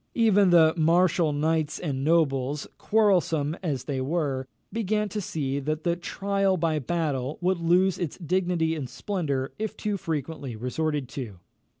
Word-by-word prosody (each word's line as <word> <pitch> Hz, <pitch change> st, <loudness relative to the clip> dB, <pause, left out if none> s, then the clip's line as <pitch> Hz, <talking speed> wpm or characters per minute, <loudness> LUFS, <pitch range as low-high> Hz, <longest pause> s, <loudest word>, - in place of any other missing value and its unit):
Even 205 Hz, -4 st, +4 dB
the 160 Hz, -2 st, +6 dB
martial 170 Hz, 0 st, +3 dB
knights 155 Hz, +1 st, 0 dB
and 135 Hz, -5 st, -3 dB
nobles, 145 Hz, -3 st, +1 dB
quarrelsome 175 Hz, -8 st, +2 dB
as 145 Hz, -9 st, -2 dB
they 135 Hz, -3 st, -3 dB
were, 135 Hz, -3 st, -1 dB, 0.3 s
began 210 Hz, -1 st, 0 dB
to 210 Hz, +2 st, -3 dB
see 140 Hz, -6 st, -2 dB
that 155 Hz, +2 st, -3 dB
the 170 Hz, -1 st, +1 dB
trial 195 Hz, +2 st, 0 dB
by 160 Hz, -2 st, +1 dB
battle 145 Hz, -3 st, -2 dB
would 185 Hz, 0 st, +1 dB
lose 180 Hz, +3 st, +3 dB
its 170 Hz, -6 st, -3 dB
dignity 175 Hz, -1 st, 0 dB
and 140 Hz, -5 st, -5 dB
splendour 140 Hz, -, -2 dB
if 220 Hz, -1 st, -3 dB
too 210 Hz, -2 st, -2 dB
frequently 150 Hz, -6 st, -4 dB
resorted 140 Hz, +4 st, -2 dB
to. 125 Hz, -8 st, -7 dB
160 Hz, 145 wpm, -26 LUFS, 140-185 Hz, 0.3 s, the